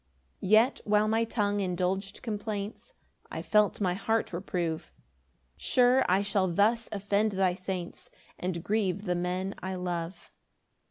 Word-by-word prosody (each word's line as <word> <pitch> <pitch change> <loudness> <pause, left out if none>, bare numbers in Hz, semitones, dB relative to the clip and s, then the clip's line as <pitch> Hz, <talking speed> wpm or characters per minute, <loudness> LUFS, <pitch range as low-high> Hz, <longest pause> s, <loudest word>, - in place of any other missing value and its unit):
5 185 - -4
Yet 225 +6 +5
while 210 0 +3
my 225 +1 +2
tongue 205 -2 0
indulg'd 190 +2 -2
complaints, 210 - -4 0.4
I - - -5
felt 210 -1 +3
my 185 -3 +1
heart 225 +1 -1
reprove; 170 -2 -3 0.7
"Sure 250 +1 +4
I 190 +2 +3
shall 200 -2 +1
thus 215 +6 +2
offend 205 +1 +1
thy 190 -1 +2
saints, 185 -1 -6 0.3
"And 180 -2 -3
grieve 200 -2 0
the 180 - +1
men 180 +2 -2
I 185 +1 -3
love." 175 -1 -4
195 Hz, 140 wpm, -29 LUFS, 180-215 Hz, 0.7 s, Yet